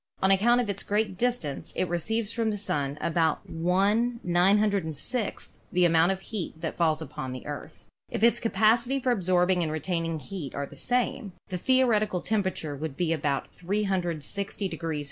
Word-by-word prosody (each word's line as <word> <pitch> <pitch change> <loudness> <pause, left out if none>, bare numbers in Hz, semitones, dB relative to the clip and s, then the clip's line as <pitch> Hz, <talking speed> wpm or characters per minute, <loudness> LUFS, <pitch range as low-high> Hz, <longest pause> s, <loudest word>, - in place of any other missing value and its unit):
On 190 - +5
account 235 +6 +4
of 245 - 0
its 200 -1 -2
great 205 -1 0
distance 215 - -1
it 185 - 0
receives 210 +6 -1
from 230 -1 0
the 210 - -1
Sun 145 -8 -2
about 160 -1 +1
V 165 0 -7 0.6
906 195 - +1 0.2
the 180 0 +4
amount 165 +1 +4
of 190 0 -3
heat 190 -7 -5
that - - -3
falls 160 -2 +1
upon 130 -4 -6
the 130 - -8
Earth. - - -8 0.2
If - - -3
its 235 - +5
capacity 235 +4 +3
for 255 -1 +1
absorbing 180 -3 +2
and 160 -2 -1
retaining 165 +1 -1
heat 150 0 -7
are 140 - -2
the 145 - -13
same, 245 - -1 0.2
the 185 - -2
theoretical 220 -6 +3
temperature 190 -8 -1
would 145 -1 -5
be 170 -2 +1
about 145 -3 -1
360 190 -1 -2
F. 165 +1 -4
185 Hz, 165 wpm, -27 LUFS, 160-215 Hz, 0.6 s, On